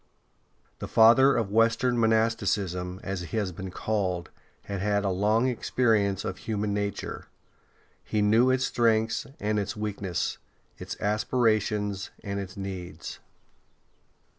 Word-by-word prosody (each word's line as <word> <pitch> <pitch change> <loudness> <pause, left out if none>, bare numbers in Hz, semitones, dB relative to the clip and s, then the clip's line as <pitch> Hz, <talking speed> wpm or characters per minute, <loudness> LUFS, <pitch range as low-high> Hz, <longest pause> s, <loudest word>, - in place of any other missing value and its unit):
The - - -5
Father 120 +4 +6
of 105 -4 -1
Western 115 +3 +3
monasticism, 100 -5 +1
as 95 -2 -3
he 90 +6 -5
has 100 -4 -1
been 95 +2 -7
called, 90 -3 -2 0.3
had 100 -2 -4
had 100 0 +1
a 100 - +1
long 105 +6 +2
experience 110 -5 +1
of - - -3
human 105 -2 -2
nature; 100 -1 -4 0.8
he 105 - -2
knew 115 +5 +4
its 130 0 +2
strength 115 -1 +1
and 105 0 0
its 105 +3 -3
weakness, 100 -6 -3 0.4
its - - -7
aspirations, 105 -2 0
and 100 0 -3
its 95 -1 -7
needs. 90 -5 -6
105 Hz, 125 wpm, -27 LUFS, 95-115 Hz, 0.8 s, Father